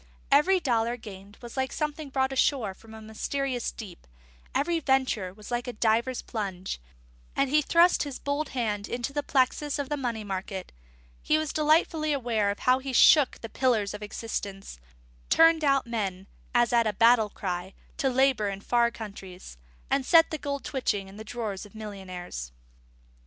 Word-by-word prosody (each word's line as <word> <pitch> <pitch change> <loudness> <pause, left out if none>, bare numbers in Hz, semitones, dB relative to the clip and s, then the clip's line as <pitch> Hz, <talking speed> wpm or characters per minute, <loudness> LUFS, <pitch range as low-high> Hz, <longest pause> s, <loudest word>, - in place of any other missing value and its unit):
Every 360 +7 +5
dollar 235 -5 0
gained 205 -2 -11
was 235 - -9
like 265 -1 -1
something 300 -1 -3
brought 265 0 0
ashore 255 -6 +1
from 220 +3 -14
a 220 - -10
mysterious 250 +3 -2
deep; 195 - -11 0.5
every 335 +4 +1
venture 265 - +1
made 185 +3 -12
was 210 +2 -11
like 240 +1 -2
a 245 - -4
diver's 235 +3 +1
plunge; 190 - -4 0.5
and 275 - +1
as - - -4
he 300 - +5
thrust 340 +4 +4
his 285 -3 -3
bold 285 +1 -2
hand 210 -5 -2
into 245 +3 -3
the 290 - 0
plexus 280 +2 +1
of 285 -2 -3
the 295 - -1
money 235 -5 -3
market, 190 -1 -5 0.5
he 310 - +2
was 310 -1 -2
delightedly 310 0 +2
aware 230 -6 0
of 200 - -2
how 255 +1 +4
he 265 0 -5
shook 290 +2 +6
the 225 - -5
pillars 220 -5 +1
of 210 - -7
existence, 200 - -5 0.5
turned 325 -1 +5
out 275 -2 +3
men 195 -5 -3 0.3
(as 240 0 +3
at 235 -1 +4
a 210 - 0
battle 230 +1 +5
cry) 185 -1 -5 0.2
to 270 - +1
labour 260 -5 +2
in 195 0 -5
far 235 +2 +2
countries, 195 - -10 0.3
and 275 0 +2
set 330 +5 +5
the 310 - -3
gold 280 0 -4
twitching 205 -8 -2
in 195 - -13
the 215 - -7
drawers 220 -4 -5
of 205 0 -14
millionnaires. 185 - -7
240 Hz, 180 wpm, -27 LUFS, 205-275 Hz, 0.5 s, shook